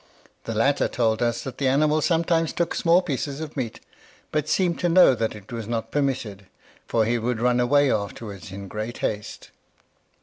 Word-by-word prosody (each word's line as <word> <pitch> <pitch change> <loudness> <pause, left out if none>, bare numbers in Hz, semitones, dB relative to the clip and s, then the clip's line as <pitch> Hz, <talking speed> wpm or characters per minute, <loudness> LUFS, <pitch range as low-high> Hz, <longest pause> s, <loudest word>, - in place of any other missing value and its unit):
The 115 - -4
latter 135 +6 +2
told 115 -2 0
us 120 -1 0
that 135 - -7
the 140 - +1
animal 150 +3 +3
sometimes 165 0 +1
took 170 - -1
small 175 +2 +3
pieces 140 -2 -3
of 155 -1 -7
meat, 125 -6 -4 0.5
but 150 0 -1
seemed 175 -3 +1
to 175 - +1
know 180 -5 +7
that 115 -2 -2
it 105 +1 -13
was 115 -3 -5
not 115 -1 -3
permitted, 125 -9 -2 0.4
for 115 -2 +2
he 120 +2 +1
would 120 0 -1
run 125 +1 +2
away 140 +3 +3
afterwards 100 -4 -4
in 100 +1 -7
great 110 +4 -5
haste. 105 -1 -5
125 Hz, 180 wpm, -24 LUFS, 110-150 Hz, 0.5 s, know